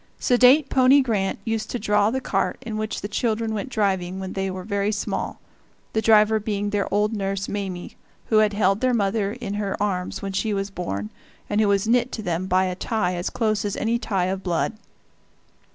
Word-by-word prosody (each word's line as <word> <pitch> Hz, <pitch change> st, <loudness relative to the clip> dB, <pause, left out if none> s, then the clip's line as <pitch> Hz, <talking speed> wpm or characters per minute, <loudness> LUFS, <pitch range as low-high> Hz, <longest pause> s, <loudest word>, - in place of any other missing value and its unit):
Sedate 255 Hz, +4 st, +5 dB
pony 265 Hz, +2 st, +5 dB
Grant 215 Hz, -7 st, 0 dB
used 225 Hz, -1 st, -2 dB
to -, -, -2 dB
draw 210 Hz, -2 st, +2 dB
the 260 Hz, +3 st, -1 dB
cart -, -, -1 dB
in 220 Hz, -2 st, -4 dB
which 215 Hz, 0 st, -3 dB
the 205 Hz, -, -3 dB
children 220 Hz, +1 st, -1 dB
went 220 Hz, +5 st, -3 dB
driving 190 Hz, -5 st, -1 dB
when 190 Hz, -1 st, -5 dB
they 195 Hz, 0 st, -2 dB
were 185 Hz, 0 st, -5 dB
very 200 Hz, +1 st, 0 dB
small, 205 Hz, -, -3 dB, 0.5 s
the 220 Hz, -, +1 dB
driver 220 Hz, 0 st, +5 dB
being 205 Hz, -1 st, -2 dB
their 205 Hz, -2 st, -1 dB
old 210 Hz, +2 st, +1 dB
nurse 195 Hz, -1 st, -2 dB
Mame, 190 Hz, -3 st, -4 dB, 0.4 s
who 220 Hz, -, +4 dB
had 215 Hz, -1 st, +3 dB
held 195 Hz, 0 st, +2 dB
their 255 Hz, -1 st, +2 dB
mother 200 Hz, -1 st, 0 dB
in 235 Hz, -5 st, -5 dB
her 200 Hz, -1 st, -2 dB
arms 185 Hz, -3 st, -2 dB
when 195 Hz, -, -3 dB
she 205 Hz, +2 st, -1 dB
was 195 Hz, 0 st, -3 dB
born, 105 Hz, -, -4 dB, 0.4 s
and 205 Hz, +1 st, +2 dB
who 215 Hz, -, +3 dB
was 200 Hz, +1 st, +2 dB
knit 245 Hz, +2 st, +2 dB
to 220 Hz, -, -4 dB
them 180 Hz, +1 st, -2 dB
by 185 Hz, 0 st, +3 dB
a 185 Hz, -, -1 dB
tie 185 Hz, -1 st, -1 dB
as 175 Hz, 0 st, -2 dB
close 215 Hz, -3 st, 0 dB
as 205 Hz, -1 st, -2 dB
any 230 Hz, +2 st, 0 dB
tie 195 Hz, -6 st, 0 dB
of 190 Hz, +1 st, -2 dB
blood. 180 Hz, +3 st, -1 dB
205 Hz, 205 wpm, -23 LUFS, 195-220 Hz, 0.5 s, Sedate